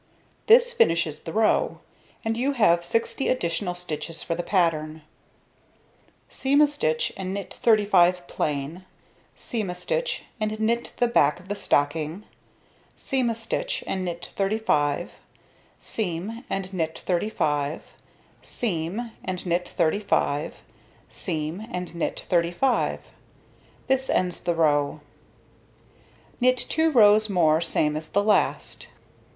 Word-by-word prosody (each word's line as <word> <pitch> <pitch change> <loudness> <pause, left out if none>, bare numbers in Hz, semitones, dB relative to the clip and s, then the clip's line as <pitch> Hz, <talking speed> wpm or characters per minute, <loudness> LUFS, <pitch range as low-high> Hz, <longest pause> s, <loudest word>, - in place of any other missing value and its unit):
This 480 +2 +6
finishes 165 - +2
the 165 - -7
row; 225 - +2 0.5
and 225 0 0
you 265 +5 0
have 175 -9 +3
60 230 +8 -1
additional 180 -5 -1
stitches 165 -1 -5
for 170 - -2
the 170 - -2
pattern. 160 -4 0 1.2
Seam 275 +2 +1
a 300 - +8
stitch 220 - -1
and 190 0 -4
knit 200 - -6
35 185 -5 +3
plain, 150 +4 -3 0.5
seam 220 -6 -3
a 180 - -4
stitch - - -2 0.2
and 215 0 -2
knit 235 +2 0
the 245 - +3
back 150 -10 +3
of 185 +2 -17
the 205 - -1
stocking, 155 +2 0 0.7
seam 260 -3 0
a 230 - -1
stitch 225 0 -3
and 190 -1 -2
knit 175 -1 -5
35, 175 -7 0 0.6
seam 215 +4 -4
and 195 0 -3
knit 160 -3 -2
35, 155 -6 -1 0.5
seam 210 +2 -3
and 185 0 -4
knit 175 0 -1
35, 165 -4 0 0.6
seam 160 +7 -4
and 180 -5 -5
knit 170 - -3
35. 175 +9 +1 0.8
This 265 0 +1
ends 180 -1 0
the 175 - 0
row. 150 -2 +2 1.4
Knit 255 0 +4
2 320 +5 +1
rows 215 -5 +5
more 160 -4 +3
same 150 -2 0
as 155 0 -5
the 200 - +1
last. 210 0 0
180 Hz, 125 wpm, -25 LUFS, 165-225 Hz, 1.4 s, a